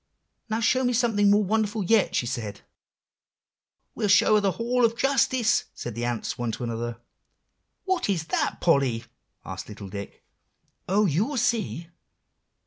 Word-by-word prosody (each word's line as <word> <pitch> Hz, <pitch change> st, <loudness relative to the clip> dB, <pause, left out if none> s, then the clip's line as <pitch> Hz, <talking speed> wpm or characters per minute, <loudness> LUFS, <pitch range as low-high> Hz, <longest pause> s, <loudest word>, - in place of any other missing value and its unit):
'Now 220 Hz, +1 st, -1 dB
show 255 Hz, +3 st, +2 dB
me 245 Hz, 0 st, +1 dB
something 225 Hz, -4 st, +3 dB
more 205 Hz, +1 st, +4 dB
wonderful 215 Hz, +1 st, 0 dB
yet,' 215 Hz, +1 st, +2 dB
she -, -, +1 dB
said. 110 Hz, -4 st, -5 dB, 1.3 s
"'We'll 215 Hz, -, -1 dB
show 200 Hz, +2 st, +5 dB
her 210 Hz, -, +5 dB
the 195 Hz, -2 st, +1 dB
Hall 245 Hz, +2 st, 0 dB
of 230 Hz, 0 st, +2 dB
Justice,' 260 Hz, -3 st, +2 dB
said 120 Hz, -, -6 dB
the 120 Hz, +2 st, -3 dB
ants 120 Hz, -1 st, -3 dB
one 120 Hz, -1 st, -1 dB
to -, -, -5 dB
another." 115 Hz, 0 st, -4 dB, 0.9 s
"What 375 Hz, -, 0 dB
is 175 Hz, -5 st, 0 dB
that, 160 Hz, -, -1 dB
Polly?" 135 Hz, -8 st, +2 dB, 0.4 s
asked 95 Hz, +1 st, -7 dB
little 100 Hz, -2 st, -9 dB
Dick. 100 Hz, +1 st, -8 dB, 0.7 s
"Oh, 205 Hz, +3 st, +3 dB
you'll 205 Hz, -, 0 dB
see! 225 Hz, -8 st, -1 dB
205 Hz, 150 wpm, -26 LUFS, -, 1.3 s, show